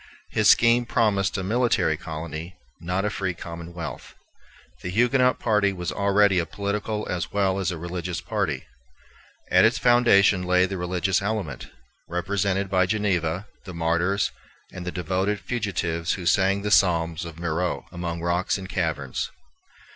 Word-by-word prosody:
His - - +3
scheme 120 +1 +5
promised 105 -5 +1
a 95 - -2
military 120 +5 +2
colony, 80 +2 -7 0.2
not 90 +4 -2
a 105 - 0
free 95 -4 -2
commonwealth. 85 0 -8 0.7
The 90 - -4
Huguenot 125 +5 +3
party 105 -3 +2
was 90 -2 -4
already 100 -1 +3
a 85 - -2
political 105 +1 -3
as 90 -2 -3
well 100 -1 +1
as 95 -4 0
a 90 - -3
religious 85 0 -4
party. 85 - -2 0.9
At - - +6
its - - +4
foundation 120 -6 +5
lay 90 0 +3
the 95 +1 -4
religious 90 +2 0
element, 100 - -3 0.4
represented 95 +3 0
by 95 -1 +2
Geneva, 95 -4 0 0.2
the 95 -3 -8
martyrs, 85 +4 +1 0.4
and 90 0 -7
the - - -1
devoted 95 +3 -1
fugitives 90 -9 -2
who 90 - -6
sang 95 +2 +2
the 105 - -2
psalms 85 -3 +3
of 85 -2 -8
Marot 85 +1 -1
among 85 -1 -4
rocks 85 +3 0
and 95 -1 -7
caverns. 80 -8 -2
95 Hz, 145 wpm, -25 LUFS, 85-100 Hz, 0.9 s, At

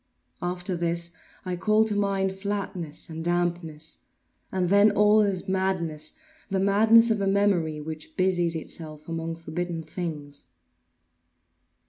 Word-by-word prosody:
After 180 +1 -2
this 170 0 -1 0.3
I 180 -1 -2
call 215 +4 +3
to 215 -1 -1
mind 195 -1 +1
flatness 190 -5 -4
and 160 -1 -6
dampness; 170 -3 -2 0.5
and 180 -2 0
then 200 +2 +6
all 210 +1 +5
is 195 -3 0
madness—the 190 - -3
madness 220 +4 +5
of 215 -2 +1
a 195 - +1
memory 195 -6 +2
which 155 +1 -8
busies 175 -3 +2
itself 155 -1 -7
among 165 0 -3
forbidden 165 +1 -4
things. 150 -3 -6
180 Hz, 120 wpm, -26 LUFS, 165-200 Hz, 0.5 s, then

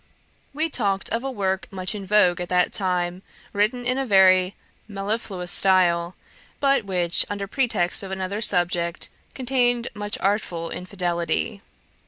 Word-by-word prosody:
We 310 +3 0
talked 200 -10 -1
of 230 +2 -1
a 270 - -2
work 190 -6 -2
much 185 -1 -3
in 200 -2 -7
vogue 180 -4 +4
at 175 - -5
that 180 -1 +2
time, 180 -2 -1 0.3
written 220 +5 0
in 255 +2 0
a 270 - -1
very 185 -2 +5 0.3
mellifluous 195 -3 -3
style, 180 -2 +3 0.4
but 275 -5 +2
which, 180 -3 +2
under 200 -1 -3
pretext 195 -6 0
of 195 - -7
another 190 +2 -3
subject, 175 -4 0 0.3
contained 245 -2 +1
much 205 -1 -4
artful 185 -4 -1
infidelity. 175 - -2
195 Hz, 140 wpm, -23 LUFS, 180-215 Hz, 0.4 s, very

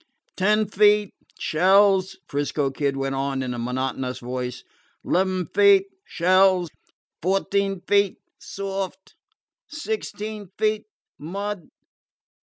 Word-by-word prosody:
"Ten 210 +3 +2
feet 210 0 +3 0.2
shells," 190 +3 +3
'Frisco 145 -1 -1
Kid 140 0 -1
went 135 0 -2
on 135 0 -1
in 125 -1 -3
a 120 - -5
monotonous 130 +1 -2
voice. 125 0 -5 0.4
"'Leven 185 0 +1
feet 400 -1 +6 0.2
shells. 185 0 +3 0.5
Fourteen 195 +1 0
feet 200 -1 +2 0.2
soft. 195 -1 -5 0.5
Sixteen 220 - -5
feet 215 0 0 0.3
mud. 195 +3 -5
190 Hz, 95 wpm, -24 LUFS, 140-205 Hz, 0.5 s, feet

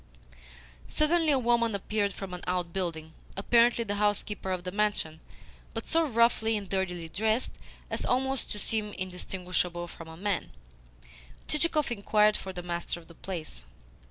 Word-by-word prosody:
Suddenly 320 +1 +3
a 280 - +5
woman 235 -3 +2
appeared 200 +1 0
from 190 -1 -7
an 180 - -5
outbuilding 170 -3 -2 0.2
apparently 235 +3 +4
the 205 -2 -2
housekeeper 205 -1 +1
of 185 -1 -1
the 180 - -3
mansion, 200 -6 0 0.6
but - - -3
so 330 -1 +2
roughly 230 -2 +3
and 200 -2 -6
dirtily 180 -3 -1
dressed 220 +7 0 0.4
as - - -2
almost 265 +1 0
to - - -2
seem 210 0 0
indistinguishable 180 -1 -2
from 165 -1 -10
a 160 0 -10
man. 190 - -1 0.9
Chichikov 305 -3 +2
inquired 210 -1 +4
for 190 - -3
the 180 -1 -6
master 170 0 -3
of 170 - -17
the - - -11
place. 165 - -6
200 Hz, 150 wpm, -29 LUFS, 180-230 Hz, 0.9 s, a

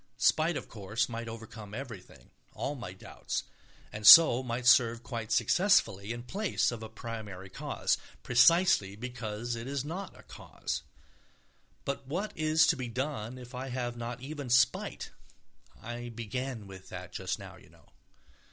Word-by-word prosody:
Spite, 160 +1 +3
of - - -7
course, 105 +1 -2
might 115 -1 -5
overcome 110 -2 -9
everything, 110 - -9 0.2
all 145 - -2
my 120 -10 -7
doubts, 95 - -5 0.5
and 105 0 -1
so 160 -7 +11
might 125 -1 -4
serve 120 -3 +5
quite 115 -3 -5
successfully 110 - +3
in 120 0 -5
place 195 - 0
of 120 -2 -6
a 110 - -7
primary 105 -4 -7
cause, - - -1 0.2
precisely 125 - +4
because 120 0 -4
it 115 +2 -6
is 140 0 -2
not 180 +4 -6
a - - -14
cause. 65 - -6 1.0
But 140 -1 -4
what 185 +9 -3
is 155 0 +4
to - - +3
be 130 -2 -4
done 125 -1 -4
if 125 -1 -11
I 130 +1 -5
have 120 -1 -3
not 120 +1 -6
even 140 -1 -6
spite 120 0 +2 0.7
(I 120 +1 -6
began 120 +1 -5
with 95 -1 -12
that - - -8
just - - -3
now, - - -11
you - - -18
know). - - -22
120 Hz, 155 wpm, -30 LUFS, 110-135 Hz, 1.0 s, so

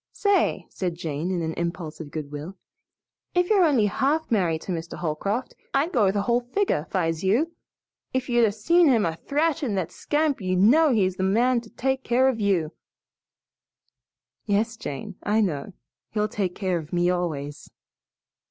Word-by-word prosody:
"Say," 405 -3 +1
said 180 -3 -3
Jane 160 0 -3
in 180 -3 -1
an 160 0 -2
impulse 170 -2 -4
of 160 -3 -7
good 145 -1 -6
will, 150 +6 -7 0.8
"if 360 +3 +2
you're 400 -3 +5
only 275 -10 +4
half 285 +9 0
married 170 -7 +1
to - - -5
Mr. 165 -1 -5
Holcroft, 195 +9 -2 0.2
I'd 295 +6 +2
go 210 -6 +3
the 200 0 -1
whole 235 +3 +2
figure, 245 - -1
'fi's 165 -2 -1
you. 240 - +2 0.6
If 260 -1 -1
you'd 240 -1 +3
'a' 220 - +4
seen 335 +12 +3
him 235 -6 +4
a 165 -1 -1
thrashin' 290 - 0
that 180 -3 -2
scamp 295 -4 0
you'd 185 -1 0
know 280 - +5
he's 190 -5 +1
the - - -3
man 235 +5 +3
to 230 - -15
take 265 +2 -1
care 255 +2 +3
of 240 -4 -2
you." 185 -7 +1 1.8
"Yes, 220 +3 +1
Jane, 185 - -6
I 210 +2 +1
know. 175 -5 -1 0.4
He'll 210 -1 +1
take 195 -4 -2
care 185 -4 -1
of 155 -1 -10
me 175 0 +2
always." 150 -5 -3
205 Hz, 170 wpm, -25 LUFS, 170-255 Hz, 1.8 s, you're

